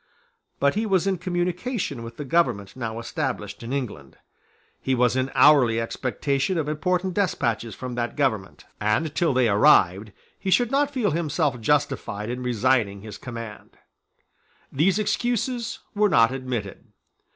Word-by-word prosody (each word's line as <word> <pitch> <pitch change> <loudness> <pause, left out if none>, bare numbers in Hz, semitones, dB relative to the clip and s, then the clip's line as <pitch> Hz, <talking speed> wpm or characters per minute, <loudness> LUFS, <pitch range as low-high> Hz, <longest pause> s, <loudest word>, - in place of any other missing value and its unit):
But 140 0 +3
he 220 +1 -1
was 190 -3 +2
in 190 -3 0
communication 180 - -2
with 115 0 -9
the 145 - -5
government 125 - 0
now 115 -3 -4
established 115 - -4
in 115 +1 -6
England. 105 - -5 0.6
He 130 - 0
was 125 0 +2
in 130 0 0
hourly 130 -7 +5
expectation 135 +7 -1
of 155 -2 -1
important 180 +4 -1
despatches 120 - -1
from 130 -1 -6
that 120 0 -3
government; 120 -10 -1
and, 110 +9 0
till 170 -4 +2
they 130 -2 +3
arrived, 100 -1 +4 0.3
he 195 - -3
should 240 +5 +3
not 285 +1 +2
feel 250 -8 0
himself 150 -5 -1
justified 135 -5 0
in 125 +1 -4
resigning 120 -4 +1
his 105 -1 -9
command. 115 -4 -9 0.9
These 175 +8 +2
excuses 240 +2 -1 0.2
were 210 0 +3
not 115 -7 +5
admitted. 125 -7 -4
135 Hz, 145 wpm, -24 LUFS, 115-175 Hz, 0.9 s, hourly